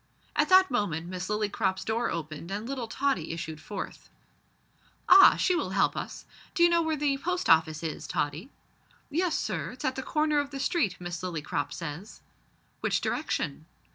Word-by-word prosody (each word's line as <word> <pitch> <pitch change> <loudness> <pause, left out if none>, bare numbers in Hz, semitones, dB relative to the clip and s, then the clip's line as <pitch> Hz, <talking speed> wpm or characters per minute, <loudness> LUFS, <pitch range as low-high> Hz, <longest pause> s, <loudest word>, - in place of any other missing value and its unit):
At - - +2
that 375 -3 +6
moment 175 -9 -1
Miss 185 +1 -5
Lillycrop's 210 -2 -1
door 230 +2 0
opened 155 0 -5
and 205 +4 -4
little 260 -3 -4
Tottie 225 - -1
issued 160 -2 -6
forth. 205 - -7 1.0
"Ah! 385 +1 +9
she 365 - +2
will - - -1
help - - +3
us. - - -6 0.3
D'you 345 -2 +5
know 340 0 +3
where 320 -1 0
the 280 -1 0
Post 360 +4 -1
Office 160 -1 +4
is, 160 -2 -4
Tottie?" 150 - -2 0.6
"Yes, 340 +1 +1
sir, 170 -7 -2
it's 250 - -8
at 260 - +1
the 265 - -4
corner 305 +2 +1
of 285 -1 -2
the 275 -1 -6
street, 270 - 0
Miss 175 -1 -5
Lillycrop 165 -5 -3
says." 165 +5 -7 0.6
"Which - - +1
direction?" 155 - -2
210 Hz, 170 wpm, -28 LUFS, -, 1.0 s, Ah